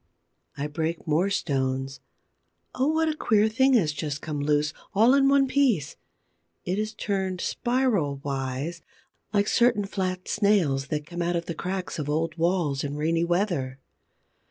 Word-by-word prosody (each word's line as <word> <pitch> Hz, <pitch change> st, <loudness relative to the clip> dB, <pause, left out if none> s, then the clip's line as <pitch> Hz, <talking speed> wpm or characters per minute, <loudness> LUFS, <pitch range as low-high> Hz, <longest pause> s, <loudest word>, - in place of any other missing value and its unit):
I 140 Hz, -, -2 dB
break 160 Hz, +2 st, -3 dB
more 165 Hz, +5 st, +2 dB
stones. 135 Hz, -7 st, -1 dB, 0.7 s
Oh, 260 Hz, +2 st, +1 dB
what 320 Hz, +1 st, +2 dB
a 310 Hz, -, 0 dB
queer 215 Hz, -7 st, +3 dB
thing 265 Hz, +5 st, +3 dB
has 170 Hz, -11 st, +3 dB
just 145 Hz, -1 st, -4 dB
come 150 Hz, -1 st, -4 dB
loose, 150 Hz, +1 st, +1 dB, 0.2 s
all 225 Hz, +6 st, +6 dB
in 275 Hz, 0 st, +4 dB
one 275 Hz, -1 st, +4 dB
piece! 255 Hz, -, +1 dB, 0.7 s
It 185 Hz, +3 st, -1 dB
is 215 Hz, +1 st, -3 dB
turned 190 Hz, -3 st, -2 dB
spiral 240 Hz, -, 0 dB
wise, 140 Hz, +4 st, -3 dB, 0.5 s
like 205 Hz, -1 st, +2 dB
certain 235 Hz, -4 st, +3 dB
flat 185 Hz, -2 st, -3 dB
Snails 180 Hz, -11 st, +2 dB
that 150 Hz, 0 st, -3 dB
come 175 Hz, +2 st, -5 dB
out 175 Hz, +1 st, 0 dB
of 170 Hz, 0 st, -2 dB
the 170 Hz, -, -4 dB
cracks 185 Hz, +1 st, -4 dB
of 145 Hz, -1 st, -3 dB
old 160 Hz, +1 st, -1 dB
walls 165 Hz, -5 st, 0 dB
in 145 Hz, 0 st, -3 dB
rainy 165 Hz, +3 st, +1 dB
weather. 170 Hz, -7 st, 0 dB
175 Hz, 155 wpm, -26 LUFS, 150-210 Hz, 0.7 s, all